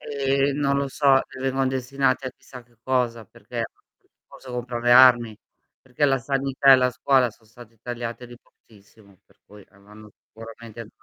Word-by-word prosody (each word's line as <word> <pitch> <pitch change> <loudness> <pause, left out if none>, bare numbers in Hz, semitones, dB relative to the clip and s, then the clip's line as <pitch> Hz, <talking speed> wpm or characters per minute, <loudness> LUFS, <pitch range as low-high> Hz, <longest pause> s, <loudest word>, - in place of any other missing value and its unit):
Ehm, 140 0 -1
non 140 -1 +1
lo 140 - -2
so, 135 -1 +3 0.2
vengono 135 0 -1
destinati 130 0 -1
a - - -4
chissà 130 -1 -14
che 120 -1 -31
cosa 120 -3 -1
perché - - -7 0.6
posso 130 - -14
comprare 120 -1 -5
le 120 - +5
armi, 120 -3 +6 0.4
perché 130 +3 -3
la 135 -2 +2
sanità 135 +1 +2
e 130 - +8
la 125 0 +1
scuola 125 0 +1
sono 110 0 -25
stati 115 -1 -17
tagliate 120 0 -7
di 120 - -13
pochissimo 100 -2 -24
per - - -30
cui 105 -1 -16
avranno 105 +2 -17 0.2
sicuramente 115 0 -11
125 Hz, 165 wpm, -23 LUFS, 115-135 Hz, 0.6 s, e